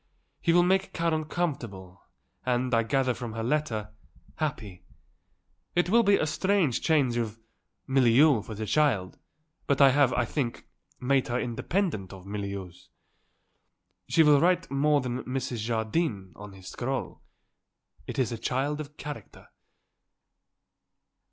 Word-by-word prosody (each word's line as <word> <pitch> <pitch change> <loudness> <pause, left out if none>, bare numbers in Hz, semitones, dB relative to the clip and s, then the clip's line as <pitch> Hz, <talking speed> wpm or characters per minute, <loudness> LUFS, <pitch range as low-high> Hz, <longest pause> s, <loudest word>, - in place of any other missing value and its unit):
He 170 - +2
will 175 +1 +5
make 190 +2 +1
Karen 165 -2 0
comfortable 115 - -4 0.4
and, 125 0 0
I 115 - +4
gather 130 +2 +1
from 120 -2 -6
her 115 0 -4
letter, 115 -6 -1 0.4
happy. 110 - -4 0.9
It 175 +1 +2
will 235 +2 +6
be 200 -2 +4
a - - 0
strange 165 - +1
change 140 -7 +2
of 115 -1 -3 0.5
milieu 135 0 +4
for 110 +1 -8
the 110 +1 -4
child, 110 -9 +1 0.5
but 140 - +1
I 135 -2 +7
have, 140 -1 +4
I 125 -1 +1
think, 125 -2 -3 0.3
made 135 +1 +1
her 120 +1 -1
independent 120 - -2
of 95 -1 -12
milieus. 100 -3 -6 1.2
She 165 - +5
will 150 -2 +5
write 180 -1 +2
more 145 +1 +3
than 125 0 -3
Mrs. 130 -1 -3
Jardine 110 - -2
on 105 -1 -10
his 95 -1 -13
scroll. 130 0 -4 0.9
It - - -6
is 130 -2 +1
a 115 - -4
child 140 +5 -1
of 150 0 -11
character." 145 -9 -9
130 Hz, 140 wpm, -28 LUFS, 110-150 Hz, 1.2 s, I